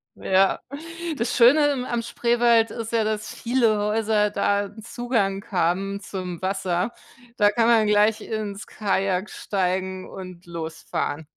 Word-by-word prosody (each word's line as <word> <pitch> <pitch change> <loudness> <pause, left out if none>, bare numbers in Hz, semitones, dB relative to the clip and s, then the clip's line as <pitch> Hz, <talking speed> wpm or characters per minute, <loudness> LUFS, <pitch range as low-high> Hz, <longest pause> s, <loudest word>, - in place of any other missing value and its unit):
Ja, 190 0 +2 0.6
das 235 -1 -1
Schöne, 280 +5 +6
ähm, 255 -2 -2
am 240 -1 -1
Spreewald 235 -1 +2
ist 230 -1 -5
ja, 225 -1 +2
dass 215 0 -3
viele 230 -3 +2
Häuser 210 0 +1
da 205 0 +1
'n 215 +2 -11
Zugang 225 -5 -1
haben 190 +2 0
zum 185 -4 -6
Wasser. 190 +2 -1 0.5
Da 205 0 +5
kann 230 +2 +2
man 225 -2 +5
gleich 210 +1 +3
ins 210 -2 -5
Kajak 195 -1 -1
steigen 185 -1 -2
und 185 -2 -10
losfahren. 160 -2 -4
210 Hz, 135 wpm, -24 LUFS, 190-230 Hz, 0.6 s, Schöne